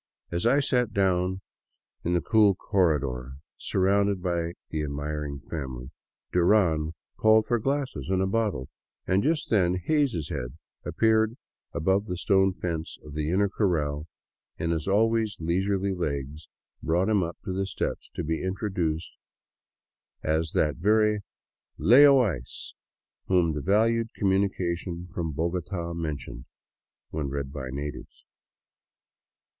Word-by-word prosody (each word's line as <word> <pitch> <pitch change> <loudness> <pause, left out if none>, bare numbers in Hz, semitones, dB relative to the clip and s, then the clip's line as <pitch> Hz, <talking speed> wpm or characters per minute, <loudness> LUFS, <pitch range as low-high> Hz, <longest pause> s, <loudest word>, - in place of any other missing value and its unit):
As 85 +6 0
I 140 +4 +4
sat 125 -4 +1
down 95 -1 +1 0.6
in 85 +1 +1
the 85 - +2
cool 105 -3 +4
corredor, 70 -11 0 0.2
surrounded 100 +1 +1
by 85 -2 -1 0.2
the 80 - -1
admiring 75 -1 -4
family, 65 -4 -6 0.4
Duran 85 -4 +3 0.2
called 110 0 +5
for 120 -1 +1
glasses 135 - -2
and 95 -1 +2
a 95 - +2
bottle, 100 - -1 0.4
and 95 +2 +2
just 155 +3 0
then 90 -5 +3
Hays' 120 - 0
head - - -5 0.3
appeared 110 +1 +2 0.3
above 95 +5 +1
the 90 - -3
stone 95 +1 +3
fence 85 -3 -4
of 75 - -9
the 75 0 -2
inner 100 +4 +3
corral 80 -7 -1 0.5
and 85 - -1
his 80 0 -2
always 110 +1 +2
leisurely 95 +4 0
legs 75 -3 -4 0.3
brought 85 +4 +1
him 105 -3 +3
up 85 0 -3
the 95 +1 -2
steps - - -3
to - - -2
be 80 +2 -2
introduced 95 -4 -2 1.1
as 80 +1 0
that 75 -3 +1
very 105 +2 +3 0.4
" - - -54
Lay 145 +4 +10
O 135 -2 +6
Ice 80 - -4 0.3
" - - -62
whom 90 -4 +3
the 75 - -3
valued 115 +5 +2
communication 90 -3 -1
from 85 -3 -2
Bogota 85 +2 -2
mentioned 75 -7 -5 0.3
— - - -67
when 75 -3 -2
read 70 0 -4
by 65 -3 -5
natives. 70 +2 -7
90 Hz, 135 wpm, -27 LUFS, 80-100 Hz, 1.1 s, Lay